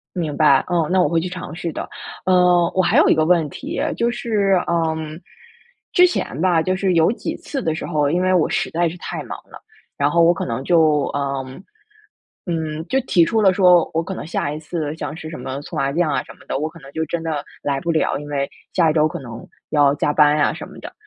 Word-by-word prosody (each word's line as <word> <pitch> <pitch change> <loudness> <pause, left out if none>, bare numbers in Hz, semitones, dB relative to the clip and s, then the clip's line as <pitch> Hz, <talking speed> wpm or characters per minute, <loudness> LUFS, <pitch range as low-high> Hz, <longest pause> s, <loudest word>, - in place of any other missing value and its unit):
明 160 -5 -2
白， 140 -3 +4
嗯， 170 -4 +1
那 185 0 +3
我 180 - +3
会 165 -1 +1
去 180 - -3
尝 180 -3 -7
试 170 -1 -4
的。 - - -5 0.4
呃， 180 -2 +4
我 185 - +3
还 175 - +2
有 - - +5
一 - - +5
个 155 - +2
问 165 -2 +2
题， - - -5 0.2
就 235 0 +1
是， 205 -6 +1
嗯 160 -1 -2 0.7
之 360 -1 +6
前 155 - -3
吧， 175 -2 +3
就 185 +3 0
是 190 -1 +1
有 165 +1 +4
几 - - -4
次 275 - -5
的 160 - 0
时 - - -5
候， 150 -3 +1
因 175 +3 +1
为 185 0 +2
我 175 -4 +3
实 - - -1
在 170 +1 +1
是 165 - -7
太 - - -5
忙 - - -6
了， - - -12 0.4
然 145 -1 +3
后 170 +2 +3
我 165 +1 +6
可 - - -3
能 115 +2 -3
就， 155 -3 +3
嗯， 135 +1 -4 0.8
嗯， 160 -2 -3
就 265 - +1
提 180 -9 +3
出 220 +6 +1
了 190 -2 +5
说， 180 -2 +5
我 165 - +2
可 190 +3 -5
能 - - -6
下 155 -3 -2
一 150 - -5
次 155 -1 -4
像 150 -1 -5
是 160 - -8
什 160 - -7
么 130 +2 -5
搓 160 - -9
麻 135 -1 +1
将 170 +2 +1
啊 - - 0
什 - - -12
么 - - -26
的， - - -1
我 155 - -1
可 165 +1 -14
能 135 -1 -13
就 160 - -2
真 165 +2 -3
的 150 -3 -2 0.2
来 140 -1 -1
不 170 - -2
了， 160 - 0
因 145 +1 -8
为 140 -1 -2 0.2
下 170 -3 +3
一 - - -1
周 155 -1 +4
可 175 - -6
能 120 -4 -9 0.3
要 145 -2 +4
加 145 - 0
班 150 0 +4
呀 150 - +2
什 - - -8
么 - - -14
的。 - - -9
160 Hz, 270 characters per minute, -20 LUFS, 150-180 Hz, 0.8 s, 之